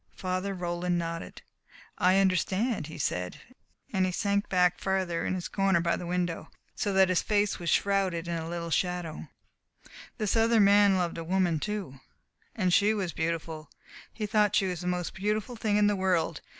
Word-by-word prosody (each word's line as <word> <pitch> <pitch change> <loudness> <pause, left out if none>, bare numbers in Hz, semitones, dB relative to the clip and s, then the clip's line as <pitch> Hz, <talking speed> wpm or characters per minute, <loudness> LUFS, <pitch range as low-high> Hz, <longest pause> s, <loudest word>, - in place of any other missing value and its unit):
Father 185 +1 -3
Roland 175 0 -1
nodded. 165 0 -5 0.6
"I 185 +1 +4
understand," 195 - +1
he 160 - -9
said, 90 0 -2 0.5
and 190 -2 +2
he 185 - +1
sank 200 +2 0
back 180 -1 +2
farther 190 -3 -1
in - - -1
his 180 - -4
corner 195 -3 +2
by 170 0 +1
the 175 - -6
window, 175 -1 -2 0.2
so 205 - -2
that 190 -1 +5
his 185 - +2
face 205 -2 0
was 170 -1 -3
shrouded 190 -4 +1
a 165 -1 -3
little 170 0 -4
in 165 - -6
shadow. 180 -2 -2 0.9
"This 215 -2 0
other 225 0 +4
man 200 -1 +5
loved 175 -2 -2
a - - -4
woman, 175 -2 +1
too. 195 -9 -4 0.6
And 185 -5 +1
she 210 +3 +4
was 185 -6 -2
beautiful. 160 -2 -3 0.4
He 215 - -4
thought 210 0 +2
she 200 - +3
was 180 -3 -3
the 180 - -4
most 180 -1 -2
beautiful 210 +5 -2
thing 215 -2 0
in 210 - +4
the 205 0 +3
world. 180 -4 0
185 Hz, 180 wpm, -28 LUFS, 170-200 Hz, 0.9 s, that